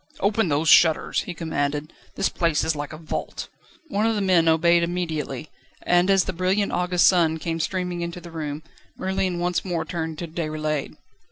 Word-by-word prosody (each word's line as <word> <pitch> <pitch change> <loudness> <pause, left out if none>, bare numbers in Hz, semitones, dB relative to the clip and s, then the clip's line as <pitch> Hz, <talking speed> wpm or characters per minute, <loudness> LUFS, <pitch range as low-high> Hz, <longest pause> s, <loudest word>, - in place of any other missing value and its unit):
"Open 205 -2 +1
those 150 +2 +1
shutters!" 160 -1 +5
he 180 - -6
commanded, 150 -2 -2 0.2
"this - - +1
place 165 -3 0
is 160 0 0
like 145 0 -5
a 155 - -8
vault." 160 0 -5 0.4
One 215 -3 +1
of 225 - +1
the 205 - -1
men 180 -4 +3
obeyed 170 +2 +4
immediately, 160 -5 -3 0.3
and 175 +2 +3
as 195 -1 +5
the 190 - -4
brilliant 185 +3 0
August 180 0 +2
sun 165 -3 +4
came 165 0 -3
streaming 180 +1 -2
into 170 +1 -4
the 170 0 -11
room, 155 -2 -5 0.3
Merlin 190 -1 -1
once 175 0 0
more 170 -4 -2
turned 160 -2 -4
to 170 - -5
Déroulède. 155 -3 -3
170 Hz, 180 wpm, -24 LUFS, 160-180 Hz, 0.4 s, shutters